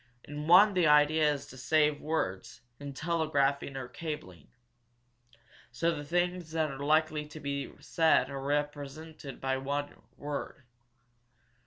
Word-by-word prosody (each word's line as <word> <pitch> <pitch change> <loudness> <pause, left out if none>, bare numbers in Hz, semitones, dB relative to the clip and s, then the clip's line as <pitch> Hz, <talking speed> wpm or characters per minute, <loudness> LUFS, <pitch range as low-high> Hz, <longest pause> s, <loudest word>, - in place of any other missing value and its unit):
In 150 +1 -6
one 185 +5 +8
kind 195 - -5
the 175 -3 +4
idea 150 +1 +5
is 140 -1 -4
to 130 - -13
save 150 +3 +2
words 150 -12 -3 0.2
in 145 0 -6
telegraphing 140 -4 0
or 130 -2 -5
cabling. 125 - -7 1.2
So 165 +8 +1
the 145 - -6
things 175 +1 -1
that 160 -2 0
are 135 - -8
likely 155 0 +2
to 155 +1 -10
be 140 -1 -4
said 160 -5 +3
are 135 -1 -5
represented 145 +1 -4
by 135 0 -1
one 145 +2 -3 0.2
word. 145 -2 -5
150 Hz, 140 wpm, -30 LUFS, 140-160 Hz, 1.2 s, one